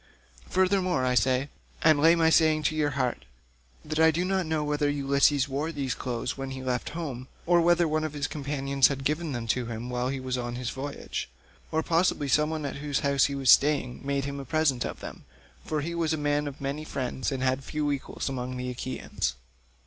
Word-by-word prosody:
Furthermore 185 Hz, -6 st, +2 dB
I 125 Hz, -, +2 dB
say, 130 Hz, +3 st, +2 dB, 0.3 s
and 155 Hz, -2 st, +5 dB
lay 165 Hz, +3 st, +6 dB
my 165 Hz, -1 st, +3 dB
saying 155 Hz, -1 st, +4 dB
to 155 Hz, +1 st, +1 dB
your 150 Hz, -1 st, +1 dB
heart, 125 Hz, -, -1 dB, 0.6 s
that 155 Hz, +1 st, -2 dB
I 160 Hz, 0 st, +7 dB
do 170 Hz, +3 st, 0 dB
not 190 Hz, -2 st, 0 dB
know 155 Hz, -1 st, 0 dB
whether 150 Hz, 0 st, 0 dB
Ulysses 140 Hz, -1 st, +2 dB
wore 145 Hz, +4 st, -2 dB
these 140 Hz, -5 st, -2 dB
clothes 120 Hz, -2 st, -3 dB
when 135 Hz, 0 st, -5 dB
he 130 Hz, 0 st, -6 dB
left 125 Hz, -1 st, -1 dB
home, 130 Hz, -7 st, -5 dB, 0.2 s
or 175 Hz, 0 st, +4 dB
whether 175 Hz, 0 st, +4 dB
one 155 Hz, 0 st, 0 dB
of 155 Hz, -2 st, -3 dB
his 145 Hz, -1 st, -2 dB
companions 140 Hz, -2 st, +1 dB
had 135 Hz, -1 st, -4 dB
given 155 Hz, +3 st, -1 dB
them 120 Hz, -3 st, -3 dB
to 125 Hz, 0 st, 0 dB
him 115 Hz, +2 st, -5 dB
while 125 Hz, +1 st, -1 dB
he 135 Hz, 0 st, -3 dB
was 130 Hz, -1 st, -2 dB
on 120 Hz, 0 st, -4 dB
his 125 Hz, -1 st, -3 dB
voyage; 140 Hz, -, -5 dB, 0.4 s
or 160 Hz, 0 st, +1 dB
possibly 165 Hz, -3 st, +1 dB
some 150 Hz, +3 st, +3 dB
one 155 Hz, -2 st, -3 dB
at 140 Hz, -, -4 dB
whose 145 Hz, 0 st, -1 dB
house 140 Hz, -1 st, +3 dB
he 140 Hz, -, -2 dB
was 135 Hz, -3 st, +4 dB
staying 140 Hz, -4 st, +3 dB
made 140 Hz, 0 st, -1 dB
him 140 Hz, 0 st, -4 dB
a -, -, -5 dB
present 135 Hz, -2 st, +1 dB
of -, -, -6 dB
them, -, -, -8 dB, 0.4 s
for 155 Hz, -1 st, -2 dB
he 170 Hz, +3 st, -3 dB
was 165 Hz, -2 st, 0 dB
a -, -, 0 dB
man 145 Hz, 0 st, 0 dB
of 140 Hz, -1 st, -7 dB
many 140 Hz, +2 st, -3 dB
friends 130 Hz, -3 st, -3 dB
and 130 Hz, -1 st, -2 dB
had 130 Hz, +1 st, +1 dB
few 150 Hz, +1 st, -1 dB
equals 140 Hz, -2 st, -4 dB
among 130 Hz, -1 st, -3 dB
the 125 Hz, 0 st, -3 dB
Achaeans. 120 Hz, -, -3 dB
140 Hz, 215 wpm, -27 LUFS, 130-155 Hz, 0.6 s, I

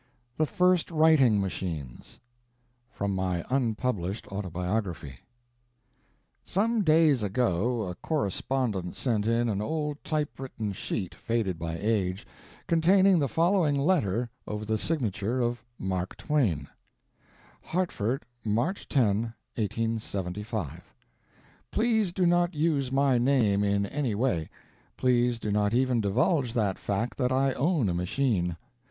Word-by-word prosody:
THE 155 Hz, -, +1 dB
FIRST 180 Hz, 0 st, +2 dB
WRITING 155 Hz, -, +5 dB
MACHINES 80 Hz, -9 st, -5 dB, 0.7 s
From 100 Hz, -5 st, -2 dB
My 90 Hz, -2 st, -1 dB
Unpublished 115 Hz, -6 st, -1 dB
Autobiography 90 Hz, -, -3 dB, 1.2 s
Some 220 Hz, +4 st, +1 dB
days 155 Hz, -, +4 dB
ago 110 Hz, +2 st, 0 dB
a 90 Hz, -2 st, -4 dB
correspondent 110 Hz, -, -2 dB
sent 110 Hz, -5 st, 0 dB
in 115 Hz, +1 st, +2 dB
an 105 Hz, -3 st, -1 dB
old 150 Hz, +4 st, -3 dB
typewritten 135 Hz, -8 st, -3 dB
sheet, 95 Hz, -1 st, -4 dB
faded 110 Hz, -7 st, -2 dB
by 80 Hz, 0 st, -3 dB
age, 100 Hz, -3 st, 0 dB, 0.4 s
containing 185 Hz, +3 st, +4 dB
the 140 Hz, -3 st, 0 dB
following 165 Hz, -, +2 dB
letter 125 Hz, -, +1 dB, 0.2 s
over 105 Hz, 0 st, -4 dB
the 110 Hz, 0 st, 0 dB
signature 120 Hz, -, -1 dB
of 120 Hz, 0 st, -1 dB
Mark 95 Hz, -1 st, -3 dB
Twain: 105 Hz, -, 0 dB, 0.9 s
"Hartford, 140 Hz, -, -2 dB, 0.2 s
March 120 Hz, -, -1 dB
10, 135 Hz, -5 st, +3 dB, 0.5 s
1875. 105 Hz, -, -3 dB, 0.8 s
"Please 220 Hz, -4 st, +1 dB
do 185 Hz, 0 st, +1 dB
not 175 Hz, 0 st, +2 dB
use 150 Hz, -4 st, +1 dB
my 135 Hz, -2 st, +3 dB
name 120 Hz, -6 st, +3 dB
in 100 Hz, 0 st, +1 dB
any 130 Hz, 0 st, -2 dB
way. 105 Hz, -9 st, 0 dB, 0.5 s
Please 120 Hz, -1 st, +2 dB
do 110 Hz, -2 st, -3 dB
not 105 Hz, +2 st, +1 dB
even 125 Hz, -2 st, +2 dB
divulge 120 Hz, -, +1 dB
that 105 Hz, -5 st, 0 dB
fact 105 Hz, +6 st, -2 dB
that 125 Hz, -1 st, +1 dB
I 135 Hz, +1 st, +2 dB
own 145 Hz, -, +1 dB
a 90 Hz, -, 0 dB
machine. 90 Hz, -1 st, 0 dB
115 Hz, 120 wpm, -28 LUFS, 100-145 Hz, 1.2 s, WRITING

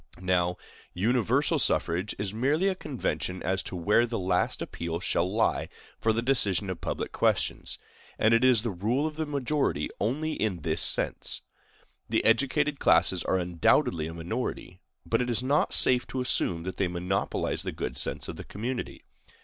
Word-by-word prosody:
Now, 90 Hz, -1 st, +1 dB, 0.4 s
universal 120 Hz, +7 st, +2 dB
suffrage 90 Hz, +5 st, 0 dB
is 100 Hz, -1 st, -2 dB
merely 145 Hz, -, +1 dB
a 195 Hz, -, +2 dB
convention 95 Hz, -, -3 dB
as 95 Hz, +1 st, 0 dB
to -, -, -7 dB
where 105 Hz, +7 st, +3 dB
the 115 Hz, 0 st, -3 dB
last 90 Hz, -1 st, 0 dB
appeal 85 Hz, 0 st, -4 dB
shall 90 Hz, 0 st, 0 dB
lie 115 Hz, +2 st, +1 dB, 0.3 s
for 110 Hz, -, +2 dB
the 115 Hz, +1 st, -1 dB
decision 105 Hz, -7 st, +1 dB
of 90 Hz, -, -7 dB
public -, -, -3 dB
questions; -, -, 0 dB, 0.4 s
and 110 Hz, +1 st, +3 dB
it 115 Hz, -, +4 dB
is 125 Hz, -4 st, +5 dB
the 115 Hz, -, -1 dB
rule 110 Hz, -, 0 dB
of 155 Hz, -1 st, -3 dB
the 155 Hz, 0 st, -3 dB
majority 140 Hz, -, -1 dB
only 150 Hz, +9 st, -1 dB
in 100 Hz, -, -2 dB
this -, -, -1 dB
sense. -, -, +3 dB, 0.7 s
The -, -, +1 dB
educated 140 Hz, +5 st, +2 dB
classes -, -, +3 dB
are 95 Hz, -, +2 dB
undoubtedly 85 Hz, -2 st, +2 dB
a 80 Hz, -, -7 dB
minority; 85 Hz, +1 st, -4 dB, 0.3 s
but 115 Hz, +1 st, +1 dB
it 125 Hz, -, -1 dB
is 120 Hz, +1 st, 0 dB
not 140 Hz, +3 st, +2 dB
safe 125 Hz, -1 st, +3 dB
to 130 Hz, -, -3 dB
assume 90 Hz, -9 st, 0 dB
that 95 Hz, +1 st, -5 dB
they 95 Hz, -, +1 dB
monopolize 90 Hz, +2 st, -2 dB
the -, -, -4 dB
good -, -, -4 dB
sense -, -, -2 dB
of -, -, -6 dB
the -, -, -7 dB
community. 120 Hz, +5 st, -5 dB
110 Hz, 175 wpm, -28 LUFS, 90-130 Hz, 0.7 s, is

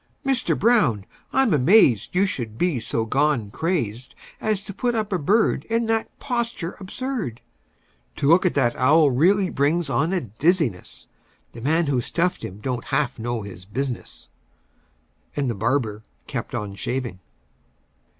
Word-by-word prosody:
Mister 270 Hz, -4 st, +1 dB
Brown, 160 Hz, -, +3 dB, 0.3 s
I'm 265 Hz, -7 st, +3 dB
amazed 145 Hz, -, +4 dB
You 190 Hz, +2 st, +4 dB
should 115 Hz, -, -3 dB
be 175 Hz, -5 st, +1 dB
so 115 Hz, 0 st, -1 dB
gone 135 Hz, -4 st, +1 dB
crazed 125 Hz, -, -2 dB, 0.2 s
As 215 Hz, -2 st, -1 dB
to 200 Hz, -, -7 dB
put 240 Hz, +3 st, -1 dB
up 215 Hz, -2 st, -1 dB
a 185 Hz, -, +1 dB
bird 205 Hz, +10 st, +2 dB
In 230 Hz, +1 st, 0 dB
that 225 Hz, 0 st, 0 dB
posture 235 Hz, -9 st, -3 dB
absurd! 205 Hz, -, -4 dB, 0.8 s
To 140 Hz, -, -1 dB
look 170 Hz, +4 st, +6 dB
at 180 Hz, -, +1 dB
that 120 Hz, -4 st, +2 dB
owl 150 Hz, +2 st, +5 dB
really 185 Hz, +9 st, +3 dB
brings 150 Hz, +2 st, +1 dB
on 155 Hz, +5 st, +1 dB
a 190 Hz, -2 st, 0 dB
dizziness; 115 Hz, -, -1 dB, 0.5 s
The 115 Hz, -, -10 dB
man 160 Hz, +6 st, +2 dB
who 135 Hz, -4 st, +1 dB
stuffed 175 Hz, +7 st, -1 dB
him 95 Hz, -, -6 dB
don't 125 Hz, 0 st, -3 dB
half 140 Hz, -5 st, -1 dB
know 120 Hz, -1 st, -3 dB
his 95 Hz, -3 st, -9 dB
business!" 120 Hz, -, -4 dB, 1.1 s
And 140 Hz, -4 st, 0 dB
the -, -, -2 dB
barber 110 Hz, 0 st, -1 dB, 0.2 s
kept -, -, -5 dB
on 105 Hz, -1 st, -4 dB
shaving. 120 Hz, 0 st, -3 dB
145 Hz, 150 wpm, -23 LUFS, 120-190 Hz, 1.1 s, look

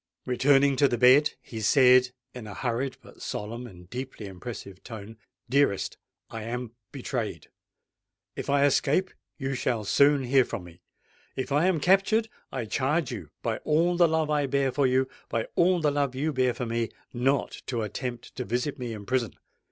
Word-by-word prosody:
Returning 135 Hz, +2 st, +4 dB
to 140 Hz, -, +5 dB
the 120 Hz, -, -1 dB
bed, 130 Hz, +5 st, +6 dB
he 110 Hz, -2 st, -7 dB
said 125 Hz, +2 st, +6 dB, 0.2 s
in 125 Hz, -4 st, -8 dB
a 105 Hz, -, -8 dB
hurried 125 Hz, +3 st, -2 dB
but -, -, -16 dB
solemn 115 Hz, +4 st, -5 dB
and 90 Hz, -5 st, -14 dB
deeply 125 Hz, 0 st, -6 dB
impressive 100 Hz, 0 st, -8 dB
tone, 110 Hz, -1 st, -9 dB, 0.3 s
"Dearest, 135 Hz, -5 st, +1 dB, 0.3 s
I 115 Hz, -, -7 dB
am 120 Hz, +1 st, -4 dB, 0.2 s
betrayed. -, -, -4 dB, 0.9 s
If -, -, -5 dB
I 140 Hz, 0 st, +4 dB
escape, 150 Hz, +6 st, +2 dB, 0.3 s
you 135 Hz, -1 st, -2 dB
shall 120 Hz, -4 st, -1 dB
soon 140 Hz, +6 st, +4 dB
hear 130 Hz, +1 st, +4 dB
from 100 Hz, -, -6 dB
me: 85 Hz, 0 st, -15 dB, 0.5 s
if 130 Hz, +1 st, -4 dB
I 150 Hz, +6 st, +3 dB
am 185 Hz, -4 st, +2 dB
captured, 195 Hz, +6 st, +3 dB, 0.2 s
I 130 Hz, -4 st, -3 dB
charge 140 Hz, +6 st, 0 dB
you—by -, -, -4 dB
all 170 Hz, +3 st, +2 dB
the 175 Hz, -1 st, +5 dB
love 160 Hz, -1 st, 0 dB
I 145 Hz, -2 st, +1 dB
bear 135 Hz, 0 st, +1 dB
for 140 Hz, 0 st, +2 dB
you—by 130 Hz, -3 st, -1 dB
all 180 Hz, +1 st, +4 dB
the 150 Hz, -3 st, +2 dB
love 140 Hz, -2 st, 0 dB
you 150 Hz, +4 st, -1 dB
bear 130 Hz, -2 st, +1 dB
for 125 Hz, -, -3 dB
me—not 120 Hz, +3 st, -2 dB
to 120 Hz, -3 st, -1 dB
attempt 120 Hz, +3 st, -5 dB
to -, -, -2 dB
visit 125 Hz, +6 st, -2 dB
me 120 Hz, -2 st, -4 dB
in 105 Hz, -2 st, -8 dB
prison! 120 Hz, -2 st, -1 dB
130 Hz, 170 wpm, -27 LUFS, 115-145 Hz, 0.9 s, bed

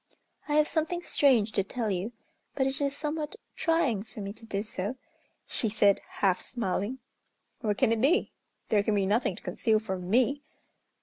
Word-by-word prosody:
"I 295 Hz, -, +2 dB
have 305 Hz, 0 st, +5 dB
something 340 Hz, +2 st, -1 dB
strange 245 Hz, -11 st, +3 dB
to 195 Hz, -, +1 dB
tell 220 Hz, +2 st, -2 dB
you, 190 Hz, +4 st, -2 dB, 0.4 s
but 265 Hz, -, +2 dB
it 270 Hz, +1 st, -1 dB
is 280 Hz, 0 st, 0 dB
somewhat 300 Hz, +3 st, -3 dB, 0.2 s
trying 325 Hz, -, +2 dB
for 215 Hz, +1 st, -11 dB
me 200 Hz, 0 st, -4 dB
to 225 Hz, +1 st, -14 dB
do 200 Hz, -1 st, -2 dB
so," 210 Hz, +2 st, -4 dB, 0.5 s
she 225 Hz, -, 0 dB
said, 205 Hz, -2 st, +4 dB, 0.2 s
half 185 Hz, -1 st, +3 dB
smiling. 225 Hz, +1 st, -2 dB, 0.6 s
"What 210 Hz, -2 st, 0 dB
can 255 Hz, -4 st, +3 dB
it 225 Hz, -1 st, +1 dB
be? 305 Hz, +9 st, +3 dB, 0.4 s
There 210 Hz, -2 st, +4 dB
can 210 Hz, +1 st, +1 dB
be 200 Hz, -1 st, +2 dB
nothing 205 Hz, -1 st, +1 dB
to -, -, -13 dB
conceal 215 Hz, +5 st, +2 dB
from 190 Hz, -4 st, -4 dB
me!" 255 Hz, +6 st, +3 dB
225 Hz, 180 wpm, -29 LUFS, 200-275 Hz, 0.6 s, have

